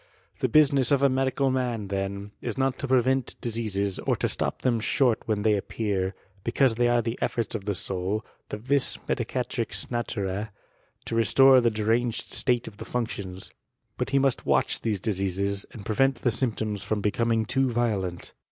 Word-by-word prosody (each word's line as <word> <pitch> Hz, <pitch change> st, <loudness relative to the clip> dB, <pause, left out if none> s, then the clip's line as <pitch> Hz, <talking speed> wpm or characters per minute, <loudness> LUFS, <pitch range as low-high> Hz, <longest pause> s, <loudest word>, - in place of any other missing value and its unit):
The -, -, 0 dB
business 140 Hz, -4 st, +4 dB
of 140 Hz, -1 st, +3 dB
a 140 Hz, -, +6 dB
medical 135 Hz, +1 st, +1 dB
man, 120 Hz, -6 st, -2 dB
then, 100 Hz, +1 st, -3 dB
is -, -, -3 dB
aot 135 Hz, -1 st, 0 dB
to 140 Hz, -, -4 dB
prevent 130 Hz, 0 st, +1 dB
diseases, 105 Hz, -4 st, -2 dB
or -, -, 0 dB
to -, -, 0 dB
stop -, -, -2 dB
them 120 Hz, -3 st, +2 dB
short 120 Hz, +1 st, +2 dB
when 105 Hz, -2 st, 0 dB
they; 110 Hz, 0 st, +4 dB
appear; 100 Hz, -2 st, -2 dB, 0.3 s
because 125 Hz, +1 st, +2 dB
they 120 Hz, +1 st, +2 dB
are 120 Hz, -1 st, +2 dB
the 115 Hz, +2 st, -3 dB
efforts 115 Hz, -4 st, -1 dB
of 105 Hz, -4 st, -4 dB
the 100 Hz, -1 st, -1 dB
soul, 95 Hz, +4 st, -2 dB, 0.2 s
thq 105 Hz, -, -5 dB
vit 135 Hz, +2 st, +2 dB
medicatrix -, -, -2 dB
natur/E, 105 Hz, -4 st, -2 dB, 0.6 s
to -, -, -3 dB
restore 130 Hz, +4 st, +6 dB
the 120 Hz, -, +3 dB
deranged 115 Hz, +2 st, -1 dB
state 125 Hz, -3 st, +1 dB
<^ 100 Hz, -, -10 dB
the -, -, -7 dB
functions: 100 Hz, -6 st, -4 dB, 0.5 s
but -, -, -1 dB
he 140 Hz, -, +2 dB
must 135 Hz, -1 st, +2 dB
watch -, -, +1 dB
these 110 Hz, -4 st, -1 dB
diseases, 100 Hz, 0 st, -1 dB
and 105 Hz, -4 st, -11 dB
prevent 135 Hz, +5 st, +2 dB
the 120 Hz, -, +3 dB
symptoms 110 Hz, -4 st, -2 dB
from 105 Hz, +1 st, -2 dB
becoming 115 Hz, +2 st, +1 dB
too 135 Hz, +3 st, +1 dB
violent. 105 Hz, -7 st, -2 dB
115 Hz, 175 wpm, -26 LUFS, 100-125 Hz, 0.6 s, a